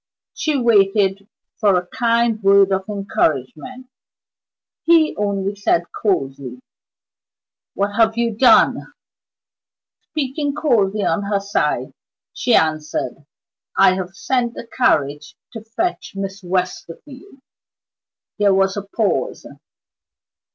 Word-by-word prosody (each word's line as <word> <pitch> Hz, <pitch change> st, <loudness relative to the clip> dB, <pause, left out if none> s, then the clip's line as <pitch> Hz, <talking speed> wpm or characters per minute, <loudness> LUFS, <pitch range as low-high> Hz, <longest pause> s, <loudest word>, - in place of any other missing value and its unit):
She 305 Hz, -2 st, -1 dB
waited 200 Hz, -4 st, +2 dB, 0.3 s
for 205 Hz, -3 st, +3 dB
a 180 Hz, -, -2 dB
kind 230 Hz, +1 st, 0 dB
word 195 Hz, 0 st, +5 dB
of 190 Hz, 0 st, -1 dB
encouragement. 195 Hz, -, -2 dB, 1.0 s
He 330 Hz, -2 st, +4 dB
only 200 Hz, -1 st, -2 dB
said, 195 Hz, -4 st, +1 dB, 0.2 s
coldly: 135 Hz, -, -2 dB, 1.2 s
"What 200 Hz, +1 st, -1 dB
have 225 Hz, 0 st, +3 dB
you 235 Hz, -2 st, 0 dB
done?" 250 Hz, +4 st, +5 dB, 1.3 s
Speaking 290 Hz, -1 st, -3 dB
coldly 215 Hz, -9 st, +1 dB
on 205 Hz, -, 0 dB
her 200 Hz, 0 st, 0 dB
side, 200 Hz, +1 st, -2 dB, 0.4 s
she 245 Hz, -, +1 dB
answered: 155 Hz, -3 st, -1 dB, 0.5 s
"I 195 Hz, -1 st, +6 dB
have 185 Hz, 0 st, -5 dB
sent 240 Hz, +1 st, -1 dB
the -, -, -8 dB
carriage 150 Hz, -, 0 dB, 0.2 s
to 225 Hz, -2 st, -8 dB
fetch 265 Hz, +11 st, -3 dB
Miss 195 Hz, 0 st, -5 dB
Westerfield." 185 Hz, -, -5 dB, 1.0 s
There 200 Hz, -2 st, +3 dB
was 195 Hz, 0 st, +1 dB
a 205 Hz, -, -3 dB
pause. 200 Hz, +1 st, -2 dB
200 Hz, 105 wpm, -19 LUFS, 190-235 Hz, 1.3 s, I